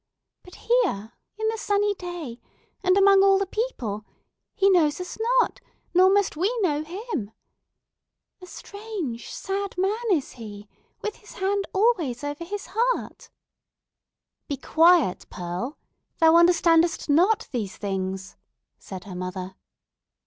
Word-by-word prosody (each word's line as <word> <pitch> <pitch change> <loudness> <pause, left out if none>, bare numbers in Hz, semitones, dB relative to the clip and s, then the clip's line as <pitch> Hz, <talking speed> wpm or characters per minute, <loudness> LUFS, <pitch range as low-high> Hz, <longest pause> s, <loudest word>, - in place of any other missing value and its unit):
But, 360 - -15
here, 380 - 0 0.2
in 440 0 -1
the 450 0 -3
sunny 410 0 +1
day, 350 -10 -7 0.4
and 370 +1 +4
among 395 0 +6
all 390 0 +5
the 395 - 0
people, 260 - -3 0.5
he 395 - +3
knows 330 -6 +3
us 360 +4 -7 0.2
not; - - 0 0.3
nor 370 +1 +6
must 405 -2 +2
we 370 +8 +1
know 305 -5 +1
him! 345 - -5 1.1
A 365 - -11
strange, 405 - -6
sad 395 0 -4
man 395 +5 0
is 310 -8 +1
he, 210 -3 -10 0.4
with 425 - -3
his 420 - -15
hand 395 +1 -1
always 370 - +1
over 290 +3 -4
his 400 +4 -6
heart!" 480 +3 -1 1.2
"Be 285 - -3
quiet, 320 - +3
Pearl—thou 245 - -1
understandest 335 -1 +4
not 370 +9 +3
these 220 -7 -4
things," 190 -1 -4 0.4
said 190 -2 -8
her 200 - -9
mother. 185 +1 -5
350 Hz, 125 wpm, -25 LUFS, 245-400 Hz, 1.2 s, among